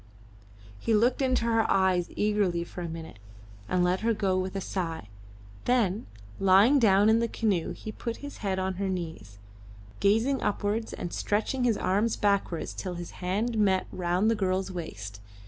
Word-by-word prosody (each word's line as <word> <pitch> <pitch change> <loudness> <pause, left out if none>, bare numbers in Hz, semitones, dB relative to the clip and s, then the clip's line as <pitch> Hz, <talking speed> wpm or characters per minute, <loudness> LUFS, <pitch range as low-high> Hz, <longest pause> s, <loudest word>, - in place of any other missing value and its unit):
He 225 - +1
looked 240 +5 +2
into 255 -3 +1
her 225 -1 +2
eyes 185 -2 +2
eagerly 205 -5 +1
for 180 - -8
a 170 - -4
minute 160 -8 -8 0.5
and 180 -1 +2
let 180 +1 +2
her 230 0 +1
go 195 -3 +1
with 185 +1 -2
a - - 0
sigh, 165 - -4 0.6
then 220 -5 +1 0.3
lying 195 +9 +6
down 205 -3 +5
in 220 +1 +5
the 235 - +1
canoe 200 -7 0
he 215 - -7
put 230 +1 -5
his 285 - -8
head 195 -2 -2
on 190 -1 -2
her 195 - 0
knees, 160 - -5 0.6
gazing 225 +7 +2
upwards 210 +2 -1
and 175 - -5
stretching 235 +5 0
his 230 -4 +2
arms 210 +5 +1
backwards 200 -5 0
till 185 -2 -5
his 175 0 -7
hands 205 +6 -1
met 195 -3 +2
round 180 +4 +1
the - - +4
girl's 190 -2 -1
waist. 100 - -7
195 Hz, 170 wpm, -28 LUFS, 180-220 Hz, 0.6 s, lying